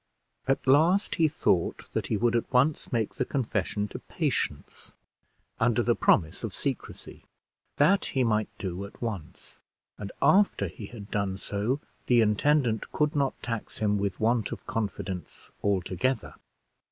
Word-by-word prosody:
At 135 - +1
last 160 +9 +4
he 160 - +6
thought 95 - 0
that - - -1
he 110 - 0
would 120 +2 +2
at 115 - -1
once 140 +4 +2
make 115 -4 0
the - - -1
confession 105 -5 -1
to - - -7
Patience, - - -3 0.6
under - - +3
the - - +3
promise 80 -1 +2
of - - -4
secrecy. - - -5 0.5
That 185 +8 +4
he 130 - 0
might 110 -2 +1
do 95 0 -4
at 100 - -13
once; 105 -9 -6 0.4
and, 100 - -5
after 195 - +4
he 100 +4 -9
had 105 -3 -10
done 100 -2 -1
so, 105 +8 -2 0.3
the 120 -1 +5
intendant 115 +2 +2
could 150 +1 +1
not 140 -2 0
tax 115 -3 -4
him 105 -1 +1
with 100 -2 -2
want 115 0 +1
of - - -7
confidence 100 -5 -4
altogether. 100 +5 0
110 Hz, 150 wpm, -28 LUFS, 100-135 Hz, 0.6 s, he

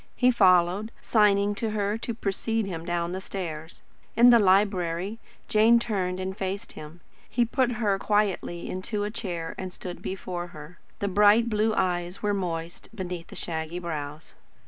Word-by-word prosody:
He 250 0 +4
followed, 185 -1 +4
signing 205 -2 +3
to 220 +2 -2
her 205 -1 -1
to 230 0 -4
precede 225 +1 -1
him 170 -4 -5
down 175 0 -1
the 190 +1 -4
stairs. 165 -5 -6 0.3
In 240 +1 +8
the 235 - +7
library, 190 0 +2 0.3
Jane 220 +2 +5
turned 190 -6 -1
and 190 0 -3
faced 195 +3 -4
him. 155 +3 -10 0.3
He 240 -1 +2
put 245 +1 +1
her 210 -4 0
quietly 200 -5 0
into 205 +3 -3
a 205 - -2
chair 175 -7 -4
and 185 -1 -4
stood 180 -1 -8
before 180 -2 -4
her. 155 +1 -12 0.2
The 200 - -2
bright 210 +4 +5
blue 215 +1 +1
eyes 175 +1 -1
were 205 0 +1
moist, 170 -3 -4
beneath 180 -4 -5
the - - -11
shaggy 160 0 -3
brows. 155 -3 -6
190 Hz, 165 wpm, -26 LUFS, 175-215 Hz, 0.3 s, In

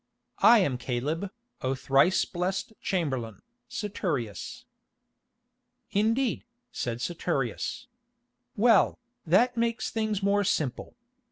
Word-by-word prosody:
"I 235 - +8
am 135 -9 0
Caleb, 145 +10 -2 0.3
O 130 +1 0
thrice 135 +7 +3
blessed 185 +4 -3
chamberlain, 130 - -2 0.3
Saturius." 155 - -3 1.3
"Indeed," 225 +5 +1 0.3
said 120 0 -3
Saturius. 150 - -2 0.7
"Well, 225 0 +4 0.3
that 235 +9 +4
makes 230 -1 0
things 215 -3 -1
more 200 +1 +3
simple. 150 -9 -1
180 Hz, 90 wpm, -28 LUFS, 130-215 Hz, 1.3 s, I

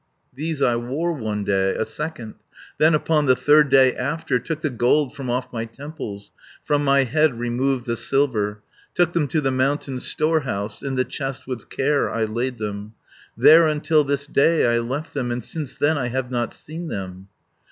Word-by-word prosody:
"These 150 +2 -3
I 120 -1 +3
wore 140 +9 -2
one 110 -7 -3
day, 95 -1 +1
a 110 - -1
second. 150 -8 -5 0.5
Then 155 +1 +5
upon 150 -1 +1
the 130 - +5
third 145 +3 +4
day 130 -1 +5
after 140 +1 -1
160 125 - -10
Took 160 -2 -3
the 155 - +1
gold 125 +4 +2
from 135 -3 -5
off 125 +1 -2
my 115 -1 -3
temples. 115 -5 -8 0.3
From 145 -1 +1
my 140 -1 +4
head 140 +1 +1
removed 120 +2 -1
the 115 -2 -1
silver, 110 -6 0 0.3
Took 175 -1 +2
them 165 -4 +1
to 155 - 0
the 135 -3 0
mountain 130 0 -1
storehouse; 135 -11 -1
In 135 -1 -3
the 130 0 +1
chest 135 -2 -5
with 125 -3 -6
care 140 +2 +1
I 115 - -1
laid 120 +3 -2
them, 105 0 -6 0.4
There 160 +1 +7
until 155 0 +2
this 140 0 -2
day 150 +3 +3
I - - +2
left 130 +7 -4
them, 130 -4 -2
And 120 -1 -3
since 150 -5 -5
then 145 +1 +2
I 125 - -1
have 125 0 -3
not 120 -2 -1
seen 165 +3 -8
them. 95 -6 -6
135 Hz, 190 wpm, -22 LUFS, 120-150 Hz, 0.5 s, There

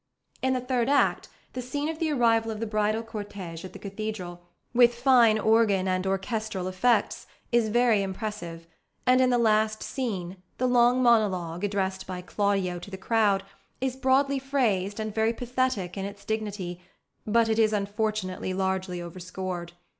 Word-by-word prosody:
In 260 0 +2
the 255 - -1
third 250 -1 0
act, 285 - +2 0.2
the 255 - -4
scene 285 +4 -3
of 320 0 -4
the 325 -2 0
arrival 230 -4 +3
of 215 -1 -4
the 230 - -2
bridal 215 +1 0
cortege 205 -7 -7
at 185 -1 -9
the - - -8
cathedral, 200 -4 -6 0.3
with 240 -1 +5
fine 240 -3 +5
organ 215 -3 +3
and 185 0 0
orchestral 195 0 -2
effects, 190 +6 +1 0.2
is 235 -2 +3
very 235 -2 +3
impressive; 190 -4 -5 0.4
and 255 0 +5
in 255 - +4
the 245 - +3
last 215 -1 +2
scene, 195 -9 -4 0.2
the 255 - 0
long 245 +1 +4
monologue, 190 -7 +2
addressed 190 -2 -1
by 185 -1 -5
Claudio 195 -2 0
to 175 - -10
the 190 - -7
crowd, 200 -1 +2 0.4
is 260 -1 -1
broadly 270 +1 +2
phrased 225 -8 0
and 215 -1 -3
very 220 +1 +1
pathetic 245 -7 -1
in 195 -1 -3
its 200 0 -9
dignity: 205 -5 -3 0.5
but 230 +1 +3
it 220 0 +1
is 215 -1 +4
unfortunately 205 -2 -2
largely 190 -1 -1
overscored. 180 0 -6
215 Hz, 160 wpm, -27 LUFS, 190-240 Hz, 0.5 s, with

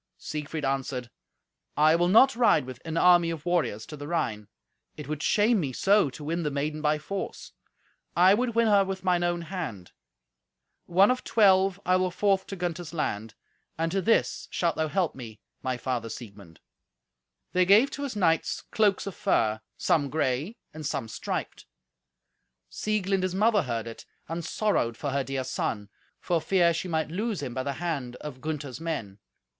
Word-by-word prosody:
Siegfried 150 0 -5
answered, 130 -3 -2 0.7
"I 155 +2 +5
will 175 +1 +2
not 245 +8 +6
ride 235 - +4
with 130 -1 -9
an 165 0 -3
army 175 -1 +5
of 165 -2 -5
warriors 165 -12 0
to 150 - -9
the 145 0 -8
Rhine; 110 -11 -2 0.5
it - - -7
would 155 0 -4
shame 215 +5 +3
me 140 -7 -2
so 200 +1 +3
to 135 +4 -10
win 165 +3 -2
the 150 - -1
maiden 150 +2 -3
by 150 0 +2
force. 190 +6 -6 0.6
I 185 +3 +6
would 235 +2 0
win 230 0 +4
her 205 -2 +5
with 190 -1 -5
mine 180 -2 +2
own 175 -1 0
hand. 155 - -6 1.0
One 190 +6 +5
of 255 - -2
twelve 195 -3 +4
I 185 +1 +4
will 185 0 +1
forth 195 +1 +1
to 195 - -5
Gunther's 175 -2 -4
land, 110 -8 -3 0.4
and 165 +1 -1
to 195 - 0
this 225 +5 +1
shalt 170 -2 0
thou 160 - 0
help 180 +1 0
me, 115 -5 -10 0.2
my 130 -1 -2
father 125 -3 -3
Siegmund." 100 -8 -10 0.9
They 185 - +4
gave 210 +9 +5
to 285 - -6
his 280 -5 -4
knights 165 -5 +1
cloaks 205 -3 +2
of 195 - -5
fur, 110 -7 +1 0.2
some 145 -3 +1
grey 150 - -1 0.2
and 155 0 -8
some 115 -5 -3
striped. - - -5 1.0
Sieglind 200 -3 0
his 185 0 -1
mother 210 +1 +3
heard 115 -6 -3
it, 115 -1 -9 0.2
and 165 +2 -4
sorrowed 160 - 0
for 145 - -3
her 140 0 0
dear 135 0 -3
son, 105 -4 -3 0.3
for 170 -2 0
fear 175 -1 +3
she 170 +3 -3
might 160 -3 -1
lose 205 -1 -2
him 125 -3 -4
by 130 - -2
the 140 +2 -2
hand 140 -6 -3
of 130 -2 -9
Gunther's 150 -4 -4
men. 115 -12 -4
165 Hz, 180 wpm, -27 LUFS, 135-190 Hz, 1.0 s, not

